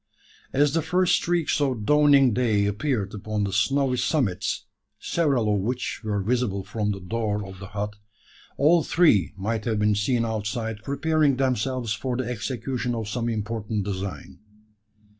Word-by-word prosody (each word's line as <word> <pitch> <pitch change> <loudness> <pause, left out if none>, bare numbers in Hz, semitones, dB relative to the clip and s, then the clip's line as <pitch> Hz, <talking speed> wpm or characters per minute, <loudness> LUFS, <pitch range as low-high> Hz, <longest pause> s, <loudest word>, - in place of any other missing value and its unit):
As 145 +1 +2
the 165 - +2
first 180 +3 +2
streaks 170 -3 +1
of 130 -7 0
dawning 145 -3 +5
day 110 -4 +2
appeared 105 -1 -1
upon 105 0 -2
the 100 -1 -2
snowy 125 +6 +2
summits 120 - 0 0.3
several 135 -10 +1
of 100 - +1
which 125 +5 -3
were 105 -2 -1
visible 110 -3 0
from 105 +2 -2
the 100 -1 -2
door 105 +1 -2
of 95 -1 -10
the 95 - -8
hut 105 +1 -4 0.6
all 165 +4 +5
three 145 - +3
might 105 +2 -2
have 110 -2 0
been 105 0 +3
seen 115 +4 +1
outside 110 0 -3
preparing 145 +1 +1
themselves 130 -3 0
for 125 +2 -3
the 130 -2 -2
execution 125 +1 -3
of 110 -2 -4
some 120 +2 -2
important 110 -1 -2
design. 100 -1 -5
115 Hz, 155 wpm, -25 LUFS, 105-135 Hz, 0.6 s, dawning